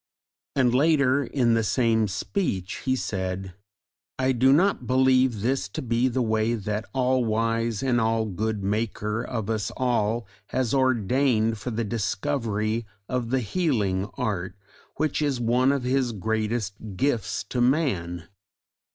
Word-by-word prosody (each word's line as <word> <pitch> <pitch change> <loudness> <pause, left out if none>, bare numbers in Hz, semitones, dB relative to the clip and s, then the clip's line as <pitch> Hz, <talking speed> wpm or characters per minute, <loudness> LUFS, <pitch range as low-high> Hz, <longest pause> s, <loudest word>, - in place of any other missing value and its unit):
And 125 -3 +3
later 140 -1 +3
in 120 -3 +1
the 115 - +3
same 110 -1 +2
speech 100 - -2
he 130 -1 +2
said: 95 -5 -3 0.6
I 130 0 +2
do 130 +1 +4
not 160 - +3
believe 130 -3 +3
this 115 -4 0
to - - -1
be 120 +1 +1
the 130 0 0
way 110 +1 +1
that 105 0 -3
the - - -28
All 130 -1 +2
wise 115 +1 0
and 125 -3 +2
All 110 0 +1
good 105 +1 -2
Maker 105 +1 -1
of 110 -5 -4
us 110 -2 -1
all 120 -2 0 0.2
has 130 -3 -1
ordained 125 -3 +2
for 125 - -4
the 115 0 -2
discovery 110 0 -1 0.2
of 125 -2 -2
the 130 +1 +1
Healing 105 - 0
Art 95 -3 -2 0.4
which 155 -1 0
is 140 -4 0
one 125 +3 +3
of 140 -2 -1
His 125 -1 +1
greatest 110 0 -1 0.2
gifts 110 -6 0
to 125 - -1
man. 95 - 0
115 Hz, 145 wpm, -25 LUFS, 105-130 Hz, 0.6 s, do